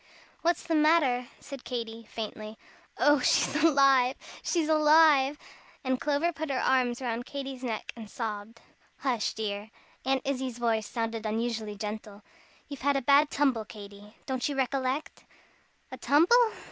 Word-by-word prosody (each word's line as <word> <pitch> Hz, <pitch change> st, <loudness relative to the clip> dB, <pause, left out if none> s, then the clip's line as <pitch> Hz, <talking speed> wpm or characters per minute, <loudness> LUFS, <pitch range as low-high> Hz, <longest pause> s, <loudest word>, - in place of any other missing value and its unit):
"What's 340 Hz, 0 st, +1 dB
the 330 Hz, -, -2 dB
matter?" 300 Hz, -6 st, +3 dB
said 275 Hz, -3 st, -10 dB
Katy, 230 Hz, -2 st, -5 dB
faintly. 215 Hz, -1 st, -7 dB, 0.4 s
"Oh, 290 Hz, -1 st, +4 dB
she's 255 Hz, -, +2 dB
alive 275 Hz, -4 st, +4 dB, 0.3 s
she's 330 Hz, -3 st, 0 dB
alive!" 305 Hz, -2 st, +5 dB, 0.5 s
and 260 Hz, -1 st, -1 dB
Clover 300 Hz, +4 st, 0 dB
put 315 Hz, -1 st, -5 dB
her 270 Hz, -, -1 dB
arms 255 Hz, -1 st, +1 dB
round 240 Hz, 0 st, -3 dB
Katy's 270 Hz, -2 st, -6 dB
neck 225 Hz, -4 st, -4 dB
and 225 Hz, -3 st, -10 dB
sobbed. 220 Hz, 0 st, -6 dB, 0.4 s
"Hush, 245 Hz, -5 st, -1 dB
dear!" 210 Hz, -1 st, -4 dB, 0.3 s
Aunt 265 Hz, 0 st, 0 dB
Izzie's 260 Hz, -3 st, -3 dB
voice 225 Hz, -3 st, 0 dB
sounded 225 Hz, -2 st, -3 dB
unusually 220 Hz, -1 st, -2 dB
gentle. 210 Hz, 0 st, -7 dB, 0.4 s
"You've 280 Hz, -2 st, -8 dB
had 285 Hz, +1 st, +2 dB
a -, -, -1 dB
bad 285 Hz, +3 st, +5 dB
tumble, 265 Hz, -6 st, +1 dB
Katy. 205 Hz, 0 st, -12 dB
Don't 260 Hz, +1 st, -2 dB
you 285 Hz, -, -3 dB
recollect?" 265 Hz, +2 st, -2 dB, 0.7 s
"A -, -, -7 dB
tumble? 440 Hz, -, +4 dB
255 Hz, 145 wpm, -28 LUFS, 225-285 Hz, 0.7 s, alive